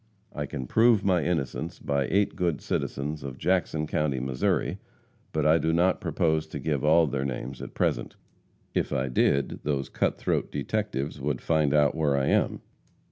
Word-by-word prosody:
I 75 Hz, -1 st, -3 dB
can 70 Hz, -3 st, -5 dB
prove 110 Hz, -, +4 dB
my 90 Hz, -4 st, +3 dB
innocence 80 Hz, -1 st, -2 dB
by 70 Hz, -2 st, -1 dB
eight 100 Hz, +1 st, +2 dB
good 85 Hz, -5 st, 0 dB
citizens 75 Hz, +3 st, -3 dB
of 65 Hz, -1 st, -7 dB
Jackson 85 Hz, -3 st, 0 dB
county, 75 Hz, -3 st, 0 dB
Mo., 65 Hz, +1 st, -3 dB, 1.0 s
but -, -, 0 dB
I 80 Hz, +2 st, +5 dB
do 80 Hz, +2 st, +1 dB
not 90 Hz, +3 st, +2 dB
propose 80 Hz, -1 st, 0 dB
to 80 Hz, -, -6 dB
give 75 Hz, -1 st, -1 dB
all 80 Hz, +2 st, +5 dB
their 70 Hz, -2 st, -2 dB
names 65 Hz, 0 st, -4 dB
at -, -, -8 dB
present. -, -, -1 dB, 0.6 s
If -, -, 0 dB
I 65 Hz, -2 st, 0 dB
did, 70 Hz, +2 st, +1 dB
those 70 Hz, -2 st, -2 dB
cut -, -, 0 dB
throat -, -, -1 dB
detectives 90 Hz, -10 st, -2 dB
would 70 Hz, -2 st, -1 dB
find 80 Hz, -3 st, +1 dB
out 75 Hz, -1 st, +4 dB
where 75 Hz, -3 st, +1 dB
I 70 Hz, -, +1 dB
am. -, -, +1 dB
75 Hz, 175 wpm, -27 LUFS, 70-80 Hz, 1.0 s, I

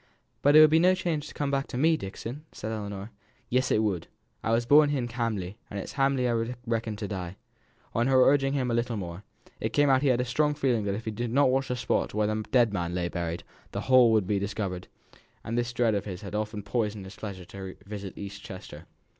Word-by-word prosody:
"But 145 Hz, +1 st, +5 dB
it 155 Hz, -, +11 dB
would 155 Hz, -1 st, +7 dB
be 160 Hz, -, +6 dB
no 185 Hz, +2 st, +5 dB
change 160 Hz, -5 st, -2 dB
to -, -, -10 dB
come 145 Hz, -1 st, -1 dB
back 135 Hz, 0 st, 0 dB
to -, -, -5 dB
me, 160 Hz, +5 st, +4 dB
Dixon," 120 Hz, +4 st, -6 dB
said 110 Hz, -, -5 dB
Ellinor. 100 Hz, -1 st, -5 dB, 0.4 s
"Yes, 125 Hz, +1 st, +2 dB
it 110 Hz, -, +3 dB
would. 95 Hz, -6 st, -1 dB, 0.4 s
I -, -, -1 dB
were 115 Hz, -, +4 dB
born 145 Hz, +5 st, +6 dB
i' 135 Hz, -4 st, 0 dB
Hamley, 110 Hz, -5 st, -2 dB
and 100 Hz, -, -6 dB
it's -, -, -7 dB
i' -, -, -15 dB
Hamley 135 Hz, -2 st, +2 dB
I 115 Hz, +1 st, -1 dB
reckon 115 Hz, -2 st, -1 dB
to 105 Hz, 0 st, -4 dB
die." 95 Hz, -3 st, -5 dB, 0.6 s
On 115 Hz, +3 st, +2 dB
her 130 Hz, -1 st, +5 dB
urging 135 Hz, -1 st, +3 dB
him 130 Hz, -3 st, 0 dB
a -, -, 0 dB
little 120 Hz, -1 st, 0 dB
more, 90 Hz, 0 st, -6 dB, 0.4 s
it -, -, -2 dB
came 145 Hz, -1 st, +4 dB
out 130 Hz, -, +6 dB
that -, -, -2 dB
he 145 Hz, -, +2 dB
had 125 Hz, -2 st, +3 dB
a 125 Hz, -, +1 dB
strong 150 Hz, +4 st, +1 dB
feeling 125 Hz, -7 st, +1 dB
that 100 Hz, -1 st, 0 dB
if 110 Hz, -, -6 dB
he 110 Hz, -, -2 dB
did 120 Hz, +2 st, -3 dB
not 135 Hz, +1 st, +4 dB
watch 135 Hz, +1 st, +1 dB
the 125 Hz, -, -1 dB
spot 120 Hz, -, -1 dB
where 105 Hz, 0 st, +2 dB
the 110 Hz, +1 st, -1 dB
dead 120 Hz, -4 st, +4 dB
man 85 Hz, -2 st, -2 dB
lay 90 Hz, -1 st, -1 dB
buried, 85 Hz, -1 st, -3 dB, 0.3 s
the -, -, -2 dB
whole 130 Hz, -3 st, +6 dB
would 110 Hz, -3 st, +3 dB
be 100 Hz, +1 st, 0 dB
discovered; 100 Hz, -2 st, -3 dB, 0.6 s
and 115 Hz, -, -3 dB
that 120 Hz, -, +3 dB
this 120 Hz, 0 st, -4 dB
dread 120 Hz, -2 st, +2 dB
of 100 Hz, -, -1 dB
his 95 Hz, -2 st, -6 dB
had 100 Hz, -, -7 dB
often 105 Hz, -1 st, -3 dB
poisoned 105 Hz, -2 st, -2 dB
the 95 Hz, -, -9 dB
pleasure 100 Hz, -4 st, -7 dB
of -, -, -17 dB
his 95 Hz, -1 st, -7 dB
visit 100 Hz, -2 st, -6 dB
to -, -, -9 dB
East 100 Hz, 0 st, -7 dB
Chester. 95 Hz, -1 st, -10 dB
115 Hz, 255 wpm, -28 LUFS, 100-130 Hz, 0.6 s, it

